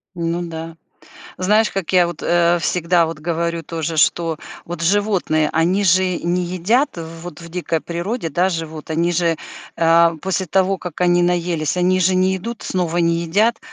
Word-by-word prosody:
Ну 170 Hz, 0 st, -2 dB
да, 165 Hz, -1 st, -6 dB, 0.6 s
знаешь, 210 Hz, +4 st, +2 dB
как 190 Hz, -2 st, -4 dB
я 180 Hz, -2 st, +5 dB
вот, 170 Hz, -2 st, -7 dB
э, 175 Hz, 0 st, +3 dB
всегда 170 Hz, 0 st, +2 dB
вот 165 Hz, -1 st, -5 dB
говорю 170 Hz, +1 st, -2 dB
тоже, 160 Hz, 0 st, -4 dB
что 165 Hz, 0 st, +2 dB, 0.3 s
вот 170 Hz, -1 st, -7 dB
животные- 180 Hz, -5 st, +1 dB
они 180 Hz, +5 st, +2 dB
же 185 Hz, 0 st, +3 dB
не 175 Hz, +1 st, 0 dB
едят. 190 Hz, -, 0 dB
Вот 165 Hz, 0 st, -8 dB
в 170 Hz, -, -10 dB
дикой 165 Hz, -2 st, -2 dB
природе, 170 Hz, +2 st, -3 dB
да, 180 Hz, +6 st, +2 dB
живут 160 Hz, -3 st, -5 dB
они 170 Hz, +2 st, +1 dB
же, 170 Hz, -1 st, +1 dB, 0.4 s
а, 165 Hz, 0 st, +4 dB
после 190 Hz, 0 st, -1 dB
того 190 Hz, +2 st, +1 dB
как 180 Hz, 0 st, -5 dB
они 175 Hz, 0 st, +4 dB
наелись, 175 Hz, -3 st, 0 dB
они 185 Hz, +1 st, +2 dB
же 185 Hz, +1 st, +3 dB
не 185 Hz, +1 st, +2 dB
идут 230 Hz, +4 st, -7 dB
снова, 175 Hz, -2 st, -2 dB
не 170 Hz, -1 st, +2 dB
едят, 215 Hz, +8 st, +2 dB
175 Hz, 170 wpm, -19 LUFS, 165-185 Hz, 0.6 s, я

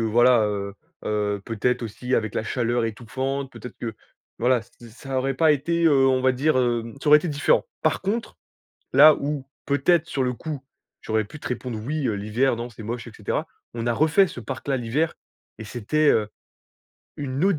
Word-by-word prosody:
voilà 120 Hz, +2 st, +4 dB
heu, 100 Hz, -1 st, -3 dB, 0.3 s
heu, 105 Hz, -1 st, -1 dB
peut-être 120 Hz, +3 st, -1 dB
aussi 125 Hz, +3 st, -3 dB
avec 110 Hz, -2 st, 0 dB
la -, -, 0 dB
chaleur 120 Hz, +1 st, 0 dB
étouffante, 130 Hz, +5 st, -3 dB
peut-être 125 Hz, -, -10 dB
que, 115 Hz, -2 st, -4 dB, 0.4 s
voilà, 125 Hz, +1 st, +3 dB
ç 110 Hz, -, -17 dB, 0.2 s
ça 135 Hz, +3 st, -6 dB
aurait 135 Hz, +1 st, 0 dB
pas 155 Hz, +2 st, +4 dB
été, 170 Hz, +4 st, 0 dB
heu, 135 Hz, -4 st, +5 dB
on 130 Hz, -1 st, +3 dB
va 130 Hz, 0 st, +3 dB
dire, 140 Hz, +3 st, +1 dB
hem, 120 Hz, -2 st, 0 dB
ça -, -, -1 dB
aurait 150 Hz, +1 st, +9 dB
été 170 Hz, -, -4 dB
différent. 145 Hz, +1 st, +2 dB, 0.2 s
Par -, -, +1 dB
contre, 225 Hz, +4 st, -2 dB, 0.6 s
là 150 Hz, +3 st, +9 dB
où 140 Hz, -1 st, -3 dB, 0.2 s
peut-être, 165 Hz, +4 st, +2 dB
sur 135 Hz, -, -1 dB
le 125 Hz, -1 st, 0 dB
coup, 150 Hz, 0 st, -6 dB, 0.4 s
j'aurais 110 Hz, -1 st, 0 dB
pu 150 Hz, +8 st, -12 dB
te -, -, -5 dB
répondre: 125 Hz, -2 st, -4 dB
«Oui, 150 Hz, 0 st, -1 dB
heu, 110 Hz, -, +1 dB
l'hiver, 110 Hz, +5 st, 0 dB
non, 120 Hz, +1 st, -5 dB
c'est 115 Hz, -1 st, -11 dB
moche» 115 Hz, +2 st, -5 dB
et 115 Hz, -, -10 dB
cetera. 105 Hz, -, -2 dB, 0.3 s
On 115 Hz, 0 st, -4 dB
a 120 Hz, -, +2 dB
refait 155 Hz, -, +4 dB
ce 125 Hz, -, -8 dB
parc 130 Hz, +5 st, -7 dB
là 135 Hz, -, +2 dB
l'hiver 130 Hz, +7 st, -1 dB, 0.4 s
et 110 Hz, -, -7 dB
c'était, 125 Hz, +8 st, 0 dB
heu, 105 Hz, -1 st, +2 dB, 0.9 s
une 135 Hz, 0 st, -3 dB
autre 195 Hz, -5 st, +3 dB
125 Hz, 200 wpm, -24 LUFS, 115-145 Hz, 0.9 s, aurait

